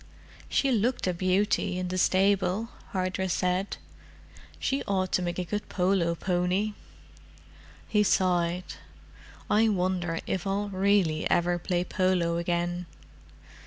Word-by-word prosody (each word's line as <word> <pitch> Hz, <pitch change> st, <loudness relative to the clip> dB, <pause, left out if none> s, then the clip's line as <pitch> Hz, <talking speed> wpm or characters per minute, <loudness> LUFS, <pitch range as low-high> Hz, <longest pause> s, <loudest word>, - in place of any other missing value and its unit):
"She 275 Hz, -, +2 dB
looked 235 Hz, +2 st, +1 dB
a 180 Hz, -, +1 dB
beauty, 185 Hz, +1 st, +1 dB
in 180 Hz, 0 st, -3 dB
the 185 Hz, -, -2 dB
stable," 195 Hz, +3 st, +2 dB, 0.2 s
Hardress 185 Hz, -1 st, -1 dB
said. 185 Hz, +2 st, -1 dB, 0.8 s
"She 270 Hz, +1 st, -1 dB
ought 190 Hz, -2 st, 0 dB
to -, -, +2 dB
make 175 Hz, -1 st, -2 dB
a 180 Hz, -, -1 dB
good 210 Hz, +4 st, -4 dB
polo 180 Hz, -2 st, +1 dB
pony." 180 Hz, +4 st, 0 dB, 1.1 s
He 210 Hz, -, +2 dB
sighed. 180 Hz, -3 st, +1 dB, 0.7 s
"I 220 Hz, +1 st, +4 dB
wonder 180 Hz, -4 st, 0 dB
if 190 Hz, +1 st, -2 dB
I'll 200 Hz, +1 st, -1 dB
really 190 Hz, -5 st, +2 dB
ever 175 Hz, 0 st, +2 dB
play 175 Hz, 0 st, -1 dB
polo 180 Hz, -3 st, +1 dB
again." 175 Hz, +1 st, -1 dB
185 Hz, 125 wpm, -28 LUFS, 175-200 Hz, 1.1 s, I